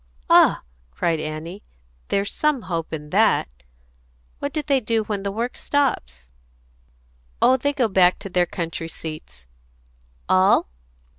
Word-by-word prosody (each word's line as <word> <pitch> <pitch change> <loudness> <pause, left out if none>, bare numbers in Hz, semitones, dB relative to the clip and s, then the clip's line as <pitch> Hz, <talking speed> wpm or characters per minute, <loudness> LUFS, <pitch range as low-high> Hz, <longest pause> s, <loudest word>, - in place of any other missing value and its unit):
"Ah!" - - +6 0.3
cried 160 - -1
Annie. 155 +5 -6 0.5
"There's 200 0 -1
some 300 -6 0
hope 165 -3 -4
in 150 -1 -6
that! 215 +3 +3 0.9
What 285 - -3
do 305 0 -2
they 275 -2 +2
do 225 -2 0
when 210 -2 -3
the 200 0 -3
work 235 +4 -3
stops?" 65 - -2 1.1
"Oh, 260 - +5
they 285 +3 0
go 260 -5 +1
back 185 -3 +4
to 195 - -7
their 180 -1 +2
country 165 -1 -4
seats." 155 - -9 0.8
"All?" 185 - +4
195 Hz, 135 wpm, -22 LUFS, 165-240 Hz, 1.1 s, Ah